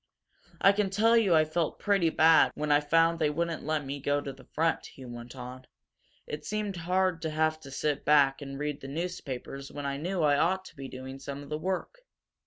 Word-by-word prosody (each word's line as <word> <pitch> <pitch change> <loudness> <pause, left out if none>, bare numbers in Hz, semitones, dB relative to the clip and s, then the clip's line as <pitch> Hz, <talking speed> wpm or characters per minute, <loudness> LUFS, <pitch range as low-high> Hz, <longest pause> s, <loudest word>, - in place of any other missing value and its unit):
"I 195 - +6
can 200 -1 0
tell 220 +4 +3
you 205 -7 +4
I 155 0 +5
felt 155 0 -1
pretty 195 -5 +2
bad 160 0 +5
when 150 0 -1
I 145 - +6
found 165 +2 +3
they 155 -2 +2
wouldn't 165 +2 -2
let 155 -1 -1
me 140 +1 -4
go 145 +1 +1
to 140 -1 -6
the 130 -1 -16
front," 165 +1 -1
he 130 - -12
went 120 +1 -9
on. 125 0 -8 0.6
"It 150 - -6
seemed 210 -2 -3
hard 180 0 0
to 160 - -2
have 155 0 0
to 140 - -11
sit 145 +1 -1
back 145 -1 +4
and 135 -1 -6
read 150 0 -3
the 135 - -7
newspapers 140 -4 -5
when 145 -1 -6
I 140 0 -2
knew 175 +3 -2
I 145 -1 +4
ought 185 +3 +1
to - - -13
be 135 -1 -7
doing 130 +1 -8
some 140 +1 -6
of 140 - -12
the 150 0 -3
work. 190 - -3
150 Hz, 220 wpm, -29 LUFS, 140-170 Hz, 0.6 s, I